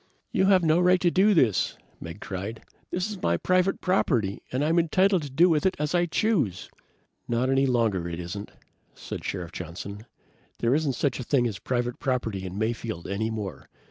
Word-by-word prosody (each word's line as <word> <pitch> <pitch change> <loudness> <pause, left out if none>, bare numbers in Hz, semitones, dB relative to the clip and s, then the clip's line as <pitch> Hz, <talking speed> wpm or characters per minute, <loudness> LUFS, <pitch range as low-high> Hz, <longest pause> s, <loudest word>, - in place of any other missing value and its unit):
"You've 190 -1 +4
no 160 +1 +4
right 180 +1 +4
to 175 -1 +2
do 200 +3 +4
this!" 115 - +2 0.2
Meggs 85 +5 -8
cried. 100 +4 -5 0.3
"This 180 +2 -1
is 210 -3 -7
my 85 0 +2
private 185 - +1
property 120 - +1
and 130 +4 0
I'm 165 +2 +3
entitled 185 +3 +3
to 145 - -6
do 160 +7 +4
with 160 -4 +2
it 190 -1 +2
as 150 +2 -2
I 175 0 +2
choose!" 160 - 0 0.6
"Not 120 +2 +1
any 135 0 +3
longer 110 -9 +1
it 85 0 -5
isn't," 90 +4 -6 0.5
said - - -7
Sheriff 90 -3 -4
Johnson. 95 +6 -7 0.5
"There 120 +2 +1
isn't 150 -2 +1
such 130 +1 -1
a - - -3
thing 125 0 +2
as 105 -5 -3
private 120 -1 -2
property 115 -8 -2
in 95 +2 -7
Mayfield, 110 -4 -3
any 105 +3 -2
more. 105 -4 -6
125 Hz, 185 wpm, -26 LUFS, -, 0.6 s, You've